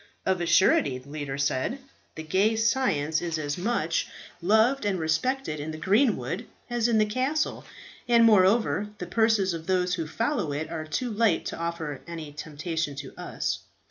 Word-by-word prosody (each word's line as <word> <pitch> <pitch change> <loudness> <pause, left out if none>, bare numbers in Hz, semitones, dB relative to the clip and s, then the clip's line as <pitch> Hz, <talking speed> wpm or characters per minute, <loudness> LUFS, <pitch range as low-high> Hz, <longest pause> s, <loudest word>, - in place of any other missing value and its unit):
"Of 190 -2 +1
a 170 - -1
surety," 145 -8 +4
the 130 +2 -14
leader 145 -3 -4
said, 140 - 0 0.4
"the 160 - -6
gay 195 +8 +2
science 220 - +1
is 170 -2 -2
as 145 -2 -2
much 175 -4 0 0.3
loved 220 +9 +3
and 200 -3 0
respected 160 - -1
in 150 +2 -4
the 155 - -5
greenwood 195 - +1 0.2
as 240 -1 +1
in 230 -2 +2
the 215 - +4
castle; 260 +8 -1 0.4
and 235 -1 +6
moreover, 205 -3 +4
the 180 - -5
purses 215 -1 +2
of 165 0 -6
those 180 -1 +1
who 165 -3 -2
follow 210 - -1
it 150 +2 -4
are 160 -2 -4
too 230 +11 -2
light 215 -5 +2
to - - -4
offer 165 -4 -4
any 165 -3 -7
temptation 150 0 -4
to 140 -1 -8
us. - - -3
180 Hz, 175 wpm, -27 LUFS, 155-225 Hz, 0.4 s, and